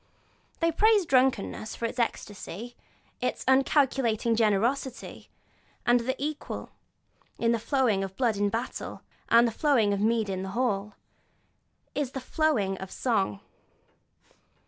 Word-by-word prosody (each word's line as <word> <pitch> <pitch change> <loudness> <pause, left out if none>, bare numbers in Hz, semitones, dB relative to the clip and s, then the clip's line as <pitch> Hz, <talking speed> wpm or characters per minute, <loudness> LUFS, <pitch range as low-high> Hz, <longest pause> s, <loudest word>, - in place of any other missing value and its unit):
They 335 0 +3
praise 420 +2 +4
drunkenness 255 -6 +1
for 235 - -3
its 230 +2 -4
ecstasy, 230 0 -4 0.5
its 250 - -2
uncalculating 265 -4 +3
generosity, 230 +4 0 0.6
and 245 +1 +2
equal 300 +2 -5 0.7
with 230 0 +2
the 230 - +1
flowing 230 -6 +1
of 190 0 -6
blood 235 -4 +2
in 205 0 +1
battle, 230 +4 -5 0.3
and 235 +1 +6
the - - -1
flowing 230 -6 +2
of 200 - -1
mead 225 0 +2
in 190 -1 -3
the 190 - -5
hall, 210 -5 -1 1.0
is 280 -3 -2
the 265 - -3
flowing 255 - 0
of 190 - -7
song. 195 - -1
235 Hz, 125 wpm, -28 LUFS, 205-265 Hz, 1.0 s, and